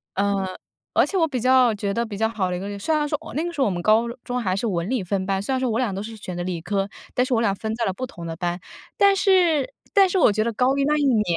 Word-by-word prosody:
呃， 200 -1 0 0.5
而 - - +4
且 390 - -2
我 325 -2 +3
比 255 -5 -3
较 255 -3 +4
觉 200 -1 -2
得 235 +2 0
比 210 -2 -7
较 220 +1 +1
好 190 -5 -1
的 180 - -2
一 - - -5
个 200 0 -5
虽 315 +9 0
然 300 -1 +1
说 300 - 0
我 - - -10
那 310 - -1
个 345 - -3
时 305 - -9
候 270 - +4
我 - - +2
们 175 -1 -3
高 220 +4 +3 0.2
中 250 0 -2
还 185 -3 0
是 210 - -2
文 175 0 -2
理 250 -7 0
分 190 +1 -2
班， 195 0 0
虽 235 - -3
然 260 - +1
说 255 -2 0
我 225 +2 0
俩 230 -7 0
都 195 - -4
是 225 +1 -7
选 185 -4 -7
的 175 - -2
理 175 -3 -3
科， 195 +1 -1 0.2
但 250 - +2
是 255 - -1
我 225 - +2
俩 200 -4 +2
分 220 +2 -4
在 235 - -2
了 190 - 0
不 255 +5 -5
同 170 -5 -10
的 165 -1 -5
班。 175 0 -2 0.4
但 400 0 +5
是 370 - +3 0.2
但 390 -2 +6
是 380 - 0
我 275 - +5
觉 215 +1 +1
得 230 - -1
高 260 +4 +2
一 275 - +2
那 300 +1 +2
一 290 - +1
年 225 -6 +3
225 Hz, 350 characters per minute, -23 LUFS, 195-265 Hz, 0.5 s, 但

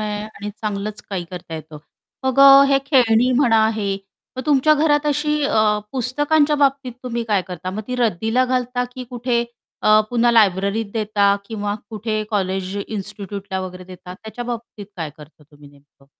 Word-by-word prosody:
आहे 210 -1 -3
आणि 210 -1 -8
चांगलंच 210 0 -5
काही 180 -3 -3
करता 175 -2 -8
येतं. 155 -1 -9 0.5
मग 260 0 0
अ, 275 0 +9
हे 275 -1 +4
खेळणी 250 -3 +4
म्हणा, 230 -4 +4
हे 200 -2 -1 0.4
मग 260 - -3
तुमच्या 300 +1 +4
घरात 295 0 +2
अशी 300 +1 0
अ, 215 -5 +2
पुस्तकांच्या 290 +4 +2
बाबतीत 275 -3 +1
तुम्ही 235 -2 -3
काय 200 -3 +2
करता 180 0 -5
मग? 205 - -4
ती 250 - -2
रद्दीला 225 +2 +1
घालता 250 -1 -1
की 255 - -6
कुठे 240 -1 0 0.4
अ, 215 0 +6
पुन्हा 240 0 +3
लायब्ररीत 200 0 +2
देता 205 -2 +2
किंवा 205 -1 -3 0.2
कुठे 215 0 -2
कॉलेज, 190 -1 -2
इन्स्टिट्यूटला 200 -2 -5
वगैरे 185 0 -7
देता? 180 0 -11
त्याच्या 220 +5 -8
बाबतीत 235 -4 -7
काय 160 -4 -4
करता 150 0 -16
तुम्ही 145 0 -18
नेमकं? 140 -1 -25
220 Hz, 165 wpm, -20 LUFS, 195-250 Hz, 0.5 s, अ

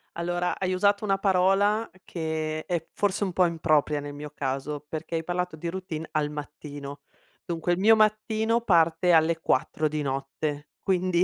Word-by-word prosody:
Allora 175 +1 -1
hai 185 -1 0
usato 200 +3 +2
una 195 -1 +2
parola 195 +3 +3
che 155 -2 -3
è 170 -2 -2
forse 205 0 0
un 190 - -1
po' 180 +1 +3
impropria 155 -3 +1
nel 145 0 -7
mio 150 +1 -7
caso, 140 +1 -3
perché 160 +1 -4
hai 165 - -1
parlato 180 0 -2
di 170 +2 -4
routine 170 -3 -5
al 150 -2 0
mattino. 145 -1 -8 0.4
Dunque 170 0 -1
il 175 - +1
mio 220 +3 +6
mattino 215 +1 +2
parte 170 -4 +3
alle 165 0 +4
4 155 -1 +1
di 150 0 -2
notte, 145 +2 -3
quindi 185 -2 +2
170 Hz, 165 wpm, -27 LUFS, 150-185 Hz, 0.4 s, mio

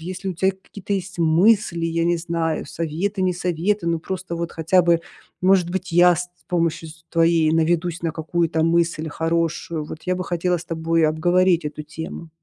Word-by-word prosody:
если 185 +3 -5
у - - -5
тебя 190 +3 +2
какие-то 200 0 -5
есть 190 -2 -5
мысли, 170 +1 +3
я 165 0 0
не 175 0 +2
знаю, 165 -1 -2
советы, 170 +5 -3
не 185 -1 +2
советы, 180 +3 -1
но 170 -1 +1
просто 180 +1 -5
вот 170 0 -4
хотя 165 +3 +3
бы, 170 -1 +3 0.4
может 185 -2 +4
быть, 185 0 -4
я 175 +1 +6
с 180 +3 -3
т - - -45 0.2
помощью, 165 -2 -1
с 160 +1 -16
твоею 165 -1 +3
наведусь 170 +1 0
на 165 - 0
какую-то 165 0 -1
мысль 165 -1 +1
хорошую. 165 0 -1
Вот 155 - -9
я 185 - +1
бы 180 - -3
хотела 175 +1 0
с 170 - -8
тобой 165 -1 +1
обговорить 175 +2 +2
эту 150 +1 -6
тему. 160 +2 -8
170 Hz, 190 wpm, -22 LUFS, 165-180 Hz, 0.4 s, я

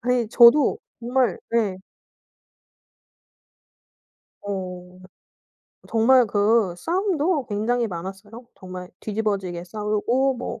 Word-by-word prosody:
아니 245 -2 0
저도 240 +5 +6 0.2
정말 250 +1 0
네. 220 -5 0 2.7
어. 180 -2 -6 0.9
정말 240 +2 +4
그 205 -2 +2
싸움도 340 - 0
굉장히 230 +3 -1
많았어요. 195 +5 -8
정말 185 -1 -9
뒤집어지게 200 -5 -3
싸우고 215 +7 0
뭐 240 - -6
220 Hz, 180 characters per minute, -23 LUFS, 195-245 Hz, 2.7 s, 저도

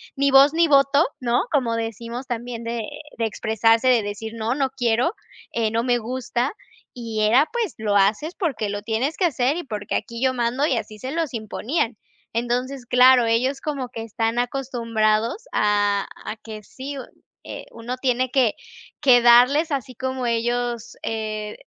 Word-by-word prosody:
ni 280 0 +2
voz 275 +2 +7
ni 335 +1 +4
voto, 280 +1 +4
¿no? 240 -1 +1
Como 250 -6 +1
decimos 230 +2 -5
también, 240 -1 -5
de 230 -1 -3 0.3
de 230 - +1
expresarse 225 +2 +2
de 245 -3 +4
decir: 210 +2 -5
"No, 225 +2 -1
no 270 -2 0
quiero, 245 - +1 0.4
eh, 225 -2 0
no 230 +1 0
me 245 -1 +2
gusta", 245 +3 -2 0.4
y 230 -3 -4
era, 235 +7 +5
pues, 460 -7 -2
lo 210 -2 -1
haces 210 - +2
porque 270 - -2
lo 205 0 -4
tienes 235 +8 -1
que 375 - +1
hacer 270 -3 +1
y 350 - -4
porque 210 -7 -4
aquí 235 -2 -4
yo 260 -1 +3
mando 245 +3 0
y 270 - +1
así 215 -2 -5
se 255 +5 -6
los 325 -2 -2
imponían. 230 +3 -2 0.4
Entonces, 245 +3 -2
claro, 250 0 +6
ellos 255 +5 +1
como 275 -5 -3
que 230 -2 -7
están 225 +1 -1
acostumbrados 235 - 0
a 205 -1 +2 0.2
a - - -4
que 215 -1 -10
sí, 275 +6 -8
u 265 - -5 0.4
eh, - - -8
uno 235 +2 -6
tiene 255 -1 0
que 250 -5 +2 0.5
que 255 -4 +6
darles 250 +7 +5
así 265 -3 -3
como 260 +1 -3
ellos, 240 0 -1
eh, 215 -1 -4
240 Hz, 170 wpm, -23 LUFS, 225-265 Hz, 0.5 s, voz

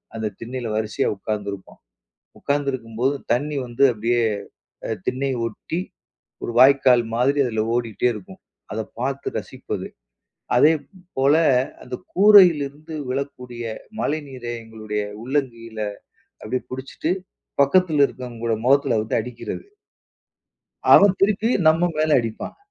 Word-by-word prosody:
அந்த 110 -1 -2
திண்ணையில 120 0 -5
வரிசையா 110 0 0
உட்காந்துருப்போம். 100 -1 -5 0.6
உட்காந்திருக்கும்போது, 130 -3 -1 0.2
தண்ணி 145 +5 0
வந்து 120 +2 0
அப்படியே 120 +2 0 0.7
அ - - -5 0.2
திண்ணைய 135 +1 0
ஒட்டி, 140 +9 -5 0.6
ஒரு - - -3
வாய்க்கால் 130 -2 +6
மாதிரி 135 +4 +2
அதில 110 -3 0
ஓடிட்டே 120 0 0
இருக்கும். 105 -4 -11 0.3
அத - - -2 0.2
பார்த்து - - -2
ரசிப்பது, - - -6 0.7
அதே 150 +6 +6 0.5
போல 135 +2 +4 0.5
அந்த - - -7 0.2
கூரையிலிருந்து 165 -7 +5 0.2
விழக்கூடிய 125 -3 -5 0.4
மழைநீரை 135 -5 -3
எங்களுடைய 110 -2 -4 0.2
உள்ளங்கையில 120 -5 -3 0.6
அப்படியே 125 +4 -3
புடிச்சிட்டு, 130 +5 -3 0.5
பக்கத்தில 155 -1 +4
இருக்கவங்களோட 120 -2 -4
மொகத்தில 135 -3 +3
வந்து 110 - -1
அடிக்கிறது. 125 -1 -7 1.3
அவன் 200 -1 +7
திருப்பி 210 +3 +2 0.2
நம்ம 160 +2 +5
மேல 155 0 +3
அடிப்பான். 115 -2 -6
130 Hz, 105 wpm, -22 LUFS, 115-145 Hz, 1.3 s, அவன்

